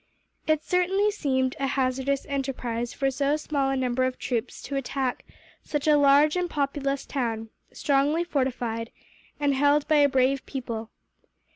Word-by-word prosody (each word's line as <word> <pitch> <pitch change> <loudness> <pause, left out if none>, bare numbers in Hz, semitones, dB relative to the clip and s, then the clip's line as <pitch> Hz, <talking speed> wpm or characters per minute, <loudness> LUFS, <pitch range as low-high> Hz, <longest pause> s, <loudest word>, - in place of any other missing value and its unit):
It 310 -1 +2
certainly 380 +3 +2
seemed 260 -8 0
a 275 - 0
hazardous 265 +1 0
enterprise 250 -4 -3
for 270 -1 0
so 280 +2 +1
small 285 -3 -1
a 270 - 0
number 255 -1 0
of 255 0 -1
troops 235 -3 -3
to 280 - -5
attack 270 -1 -2 0.4
such 295 0 -3
a 300 - +6
large 290 +2 +5
and 360 -1 0
populous 280 -2 -1
town, 225 -5 -3 0.2
strongly 290 +4 +1
fortified, 245 -7 -2 0.5
and 285 -1 +2
held 285 +2 +3
by 310 - +4
a 285 -1 +5
brave 265 0 +2
people. 230 -4 -5
275 Hz, 150 wpm, -26 LUFS, 255-290 Hz, 0.5 s, a